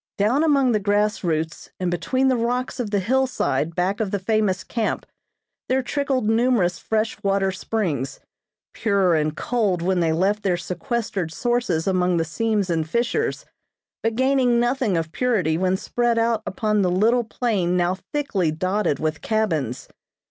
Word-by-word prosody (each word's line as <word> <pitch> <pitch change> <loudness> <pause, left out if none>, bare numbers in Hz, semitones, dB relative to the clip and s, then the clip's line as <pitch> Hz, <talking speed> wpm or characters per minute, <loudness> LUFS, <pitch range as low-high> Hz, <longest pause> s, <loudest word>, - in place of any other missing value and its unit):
Down 235 +9 +2
among 280 -5 +3
the 215 - +2
grass 205 +1 +1
roots 160 -1 -2
and 180 -1 -1
between 260 +9 0
the 260 - +3
rocks 245 +2 -1
of 235 -4 -2
the 205 - +1
hillside 200 - 0
back 185 +3 0
of 215 -3 -1
the 200 - -1
famous 195 -2 0
camp, 225 +5 -2 0.6
there 260 0 +2
trickled 270 -3 -1
numerous 225 -7 +2
fresh 220 +5 -1
water 195 -1 +1
springs, 180 - -2 0.5
pure 200 -5 +2
and 155 0 0
cold 205 -8 0
when 185 0 +1
they 165 -2 +2
left 195 +6 +1
their 185 -3 +1
sequestered 190 - -3
sources 240 -6 0
among 180 -2 +2
the 165 - +1
seams 205 +2 -1
and 160 -2 -1
fissures, 240 - -1 0.6
but 225 0 -1
gaining 260 -1 +3
nothing 240 -5 +1
of 160 -1 -2
purity 200 -11 +1
when 185 +2 +1
spread 240 +3 0
out 230 -1 +1
upon 215 -5 0
the 185 - +2
little 225 +7 +3
plain 210 -6 0
now 175 0 +2 0.2
thickly 215 - 0
dotted 185 +1 0
with 155 0 -2
cabins. 160 - -1
205 Hz, 160 wpm, -23 LUFS, 175-235 Hz, 0.6 s, among